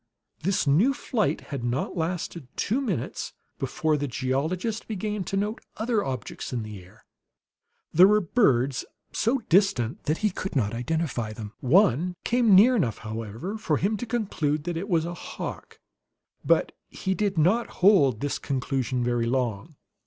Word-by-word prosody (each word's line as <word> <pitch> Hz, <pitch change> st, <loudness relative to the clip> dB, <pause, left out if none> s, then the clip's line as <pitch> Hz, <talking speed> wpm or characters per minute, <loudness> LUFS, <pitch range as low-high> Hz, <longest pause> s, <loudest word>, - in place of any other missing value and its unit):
This 185 Hz, +2 st, +1 dB
new 185 Hz, -, +4 dB
flight 210 Hz, -, -1 dB
had 135 Hz, -4 st, -3 dB
not 120 Hz, +8 st, -2 dB
lasted 170 Hz, -3 st, -3 dB
two 240 Hz, +7 st, 0 dB
minutes 195 Hz, -, -3 dB, 0.3 s
before 155 Hz, +3 st, 0 dB
the 145 Hz, 0 st, -2 dB
geologist 155 Hz, -, -2 dB
began 210 Hz, -1 st, -3 dB
to 195 Hz, -, -2 dB
note 210 Hz, +3 st, -2 dB, 0.2 s
other 220 Hz, -1 st, 0 dB
objects 130 Hz, -2 st, -5 dB
in 120 Hz, -3 st, -2 dB
the 105 Hz, -3 st, -8 dB
air. 90 Hz, -, -20 dB, 0.9 s
There 180 Hz, +4 st, +8 dB
were 210 Hz, +1 st, +5 dB
birds, 140 Hz, -, +2 dB, 0.3 s
so 230 Hz, +5 st, +2 dB
distant 170 Hz, -, +2 dB
that 155 Hz, +2 st, +1 dB
he 210 Hz, -, +3 dB
could 185 Hz, -1 st, -5 dB
not 110 Hz, -5 st, +1 dB
identify 125 Hz, -3 st, -2 dB
them; 110 Hz, -1 st, -8 dB
one 175 Hz, -, +3 dB
came 235 Hz, -4 st, +4 dB
near 235 Hz, +7 st, +7 dB
enough, 135 Hz, -, 0 dB
however, 115 Hz, -, -5 dB
for 155 Hz, -7 st, +1 dB
him 200 Hz, +5 st, +1 dB
to 245 Hz, -, -5 dB
conclude 180 Hz, -11 st, -1 dB
that 175 Hz, +1 st, -3 dB
it 190 Hz, +6 st, -4 dB
was 165 Hz, -3 st, +2 dB
a 170 Hz, -, -4 dB
hawk. -, -, -7 dB, 0.6 s
But -, -, +3 dB, 0.2 s
he 190 Hz, -, -2 dB
did 200 Hz, -2 st, -1 dB
not 190 Hz, +10 st, +3 dB, 0.2 s
hold 150 Hz, -, +6 dB
to -, -, -16 dB
this 145 Hz, -, -2 dB
conclusion 130 Hz, -2 st, -1 dB
very 120 Hz, -1 st, 0 dB
long. 125 Hz, +2 st, -2 dB
160 Hz, 160 wpm, -26 LUFS, 130-200 Hz, 0.9 s, There